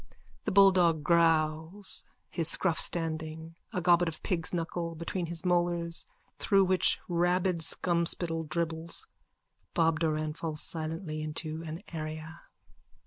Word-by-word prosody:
_(The - - +1
bulldog 185 -5 +5
growls, 165 +3 +1 0.3
his 165 -3 0
scruff 170 -2 +1
standing, 160 -1 -1 0.2
a 185 -5 -2
gobbet 175 -1 +4
of 160 -1 -5
pig's 170 -5 -1
knuckle 170 -1 -3
between 170 +2 -4
his 170 +2 -1
molars 175 -1 +2 0.3
through 195 -2 +3
which 185 0 +2
rabid 175 +1 +1
scumspittle 165 0 0
dribbles. 165 0 +1 0.7
Bob 165 -1 +2
Doran 155 -2 -1
falls 155 -1 -4
silently 160 -1 -3
into 155 +1 -4
an 160 +5 -7
area.) 155 +1 -7
165 Hz, 120 wpm, -29 LUFS, 160-175 Hz, 0.7 s, bulldog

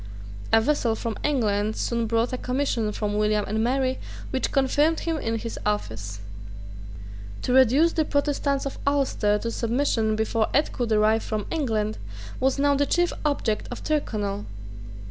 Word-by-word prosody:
A 225 - +6
vessel 235 -2 +1
from 225 -1 -3
England 215 -6 +1
soon 235 -1 -1
brought 230 +2 +1
a - - -1
commission 250 -4 -1
from 210 0 -2
William 210 -1 +2
and 220 +2 0
Mary 260 +1 0 0.3
which 260 - -1
confirmed 290 +4 +2
him 330 -1 -1
in 225 -5 -2
his 230 +1 -5
office, 110 - -3 1.2
To 250 - 0
reduce 265 +6 +5
the 320 - +2
Protestants 285 -1 0
of 275 - -5
Ulster 265 -7 +2
to 230 +2 -3
submission 230 -2 0
before 220 0 0
aid 295 +2 +3
could 240 -2 -2
arrive 215 +1 +3
from 215 -2 -3
England 220 -9 -1 0.4
was 265 +1 +2
now 285 0 +3
the 285 0 +1
chief 350 0 +2
object 280 -8 0
of 245 - -7
Tyrconnel. 210 -9 -2
235 Hz, 155 wpm, -25 LUFS, 215-280 Hz, 1.2 s, A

